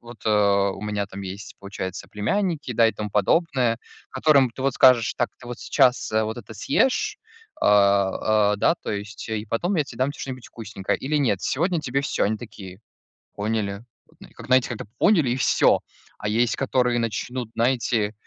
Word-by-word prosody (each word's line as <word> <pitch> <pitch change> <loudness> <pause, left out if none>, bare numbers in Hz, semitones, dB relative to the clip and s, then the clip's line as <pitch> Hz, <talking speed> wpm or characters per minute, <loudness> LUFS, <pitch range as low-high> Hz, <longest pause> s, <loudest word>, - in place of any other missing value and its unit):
вот, 120 -1 -12
э, 100 -2 +3
у - - -10
меня 105 -1 -2
там 95 0 -9
есть, 100 +1 -8
получается, 100 -2 -6
племянники, 160 - -1
да, 115 0 +4
и - - -2
тому 105 -1 -5
подобное, 125 - +1 0.3
которым 135 -2 +3
ты 130 +3 -8
вот 135 -1 +1
скажешь: 125 -4 +5
"Так, 120 - 0
ты 120 - -13
вот 120 - -7
сейчас, 125 -3 +2
э, 110 0 +1
вот 110 +2 -4
это 115 -2 -10
съешь, 420 - +1 0.4
а, 100 +1 +3
а, - - -5
да, - - +3
то - - -7
есть, 105 +2 -6
и 110 -1 -3
потом 175 - -1
я 150 - +2
те 125 - -12
дам 130 +3 +1
те 145 - -11
что-нибудь 130 -3 -6
вкусненькое. 105 -4 -4
Или 150 +3 -1
нет: 115 -10 +1
сегодня 170 - 0
тебе 135 -1 -1
всё". 140 - -1
Они 110 +2 0
такие: 100 -4 -11 0.6
"Поняли". 105 -1 -2 0.5
Как, - - -10
знаете, 130 -1 +3
как-то 120 -4 -5
"поняли" 170 - +3
и 125 - 0
всё. - - +3 0.4
А 105 - -5
есть, 115 +2 +1
которые 125 -3 +1
начнут, 115 +1 -3
знаете, 115 -3 +1
115 Hz, 185 wpm, -24 LUFS, 105-130 Hz, 0.6 s, скажешь